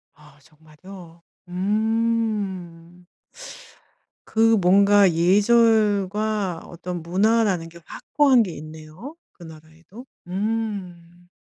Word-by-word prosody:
아 150 -1 -21
정말요? 165 +3 -16 0.3
음. 200 -4 -3 1.2
그 225 0 +2
뭔가 200 +1 +4
예절과 205 0 +1
어떤 175 0 -7
문화라는 190 0 0
게 170 +1 -15
확고한 275 -5 +1
게 190 - -6
있네요. 155 - -11 0.2
그 175 - -16
나라에도? 160 +7 -15 0.2
음. 185 -4 -5
185 Hz, 165 characters per minute, -22 LUFS, 170-215 Hz, 1.2 s, 뭔가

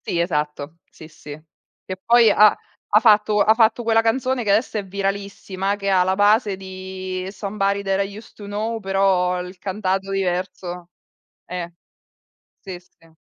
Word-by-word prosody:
Sì, 170 - -1
esatto, 150 -2 -2
sì, 160 - -13
sì. 150 -1 -11 0.5
Che 185 - -6
poi 235 -1 +5
ha 210 +1 +6 0.4
ha 210 - +8
fatto 210 -2 +4
ha 215 - +5
fatto 225 +1 +2
quella 225 0 +3
canzone 250 +2 0
che 210 - -3
adesso 215 +3 +1
è 200 - -6
viralissima 195 0 -3
che 200 -1 -3
ha 185 -1 +4
la 190 +1 0
base 205 0 +3
di 185 -1 -6
Somebody 200 0 -2
that 195 0 0
I 200 +1 -8
used 220 - -13
to 205 - -11
know, 215 +3 -3
però 190 -2 +1
il 180 +1 -9
cantato 195 0 -2
diverso. 180 -2 -3 0.6
Eh, 175 -1 -6 0.9
sì, 190 -2 -8
sì. 175 -2 -24
195 Hz, 160 wpm, -21 LUFS, 185-210 Hz, 0.9 s, ha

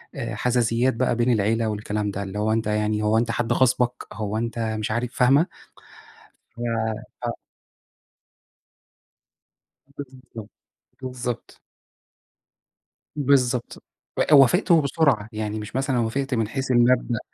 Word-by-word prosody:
آآ 115 -6 -4
حَزَازِيَّات 120 +1 +1
بقى 120 +1 0
بين 120 +1 +2
العيلة 110 +1 +1
والكلام 105 0 -3
ده، 100 +1 -4
اللي 100 +2 -5
هو 110 +1 +1
أنت 110 -1 -1
يعني 105 0 0
هو 110 +1 +2
أنت 115 0 +1
حد 120 0 0
غاصبك، 125 -1 +1
هو 105 0 -3
أنت 115 +1 -3
مش 110 -1 -2
عارف، 120 +2 -2
فاهمة، 135 +6 +4 1.1
ف - - -10 0.7
آه. - - -1 2.6
بالضبط. 130 -6 -11 0.5
بالضبط. 125 -2 -6 1.6
بالضبط، 130 -4 +1 0.4
إ - - +2
وافقت 140 +5 +5
وبسرعة، 140 -8 +2
يعني 110 0 -4
مش 105 +2 -8
مثلًا 135 -1 0
وافقت 135 +4 -1
من 115 -3 0
حيث 135 +3 -3
المبدأ، 120 -1 +3
120 Hz, 120 wpm, -23 LUFS, 110-130 Hz, 2.6 s, وافقت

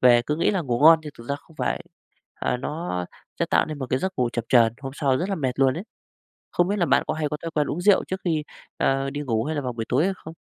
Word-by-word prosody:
về 120 -1 +6
cứ 150 +5 -2
nghĩ - - +2
là 195 -3 0
ngủ 125 -6 -1
ngon 160 +2 +8
nhưng 150 -2 -8
thực 115 - -10
ra 140 - +1
không 155 +2 -21
phải. - - -1 0.5
À, - - -1
nó 130 - -3 0.3
sẽ - - +2
tạo - - +3
nên 155 -2 -6
một 130 - -3
cái 130 - +2
giấc 190 +4 -2
ngủ 125 -1 +2
chập 120 - -2
chờn, 115 -3 +5
hôm 135 -1 -5
sau 140 -3 +1
rất 180 +8 -2
là 200 - 0
mệt 135 -7 -1
luôn 135 -1 +4
ấy. 175 - -5 0.7
Không 175 0 +2
biết 205 - 0
là 175 - +2
bạn - - +4
có - - -1
hay 155 -1 -1
có 150 - -3
thói 165 - -4
quen 150 -2 0
uống 160 - -3
rượu 200 +2 +4
trước 190 0 -4
khi, 160 -3 0 0.3
ờ, 135 0 +1
đi 145 +1 -4
ngủ 115 -6 0
hay 155 - -2
là - - 0
vào 125 - -3
buổi 115 -1 -4
tối 130 +6 +2
hay 195 +1 +1
không? 160 -2 -10
145 Hz, 300 wpm, -24 LUFS, 130-165 Hz, 0.7 s, ngon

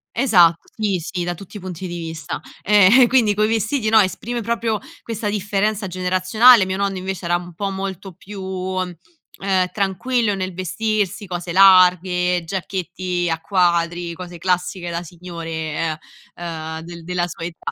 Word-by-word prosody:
Esatto, 180 -10 +4
sì 205 -5 0
sì, 175 +2 -4
da 175 0 -2
tutti 195 +4 -13
i - - -5
punti 185 0 -6
di 175 - -5
vista. 160 -3 -5 0.2
Ehm 210 +5 +6
quindi 230 -5 +3
coi 215 +1 +2
vestiti 225 +1 0
no, 225 - +5
esprime 235 +5 -2
proprio 230 -1 -1 0.3
questa 220 -2 -3
differenza 205 0 -1
generazionale, 185 +5 +4
mio 185 - -2
nonno 200 -1 -1
invece 185 -1 -5
era 175 0 +2
un 175 -1 -10
po' 200 +3 -3
molto 195 0 -5
più, 195 +3 -10
ehm, 185 - -3
tranquillo 205 +3 0
nel 185 -1 -4
vestirsi, 205 +2 -2
cose 175 -1 -5
larghe, 180 -2 +5
giacchetti 180 0 -3
a 165 - -1
quadri, 170 -1 +1
cose 175 0 -9
classiche 180 0 -1
da 170 0 -3
signore 170 -1 -8
e, 160 0 -2 0.4
ehm, 160 -2 -6
del 170 0 -10
della 175 -1 -1
sua 170 -1 -7
età. 170 -1 -6
185 Hz, 155 wpm, -20 LUFS, 175-205 Hz, 0.4 s, Ehm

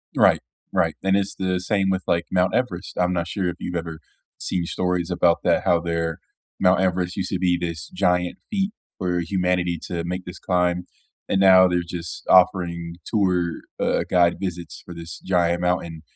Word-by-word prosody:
Right. - - +5 0.3
Right. - - +1
And 95 0 +3
it's 100 -1 0
the 95 -1 -1
same 95 0 0
with, 95 -1 0
like, 85 0 +1
Mount 90 0 +2
Everest. 110 -9 -2
I'm 90 0 +2
not 85 -1 -1
sure 95 -3 -2
if 90 - -2
you've 90 - -5
ever 80 -1 -4 0.4
seen 90 -2 -2
stories 90 0 -1
about 85 -1 +3
that, - - +2
how 85 - +4
their 85 -1 -2 0.4
Mount 90 -1 +4
Everest 90 -1 0
used 95 -2 -2
to 95 - -1
be 90 -1 +2
this 85 -3 -4
giant 90 -1 +1
feat 200 -1 0 0.3
for 90 -1 -1
humanity 90 -1 0
to 85 -1 -3
make 90 +1 -4
this 90 0 -8
climb, 90 -1 0 0.4
and 95 - +2
now 95 -1 +7
they're 90 -1 +1
just 85 -4 -6
offering 85 -2 +3
tour, 90 -5 0 0.2
uh, - - +1
guide 85 -1 +4
visits 90 -3 -5
for 90 - -9
this 85 0 -8
giant 85 -2 +1
mountain, 85 -3 -1
90 Hz, 180 wpm, -23 LUFS, 85-95 Hz, 0.4 s, now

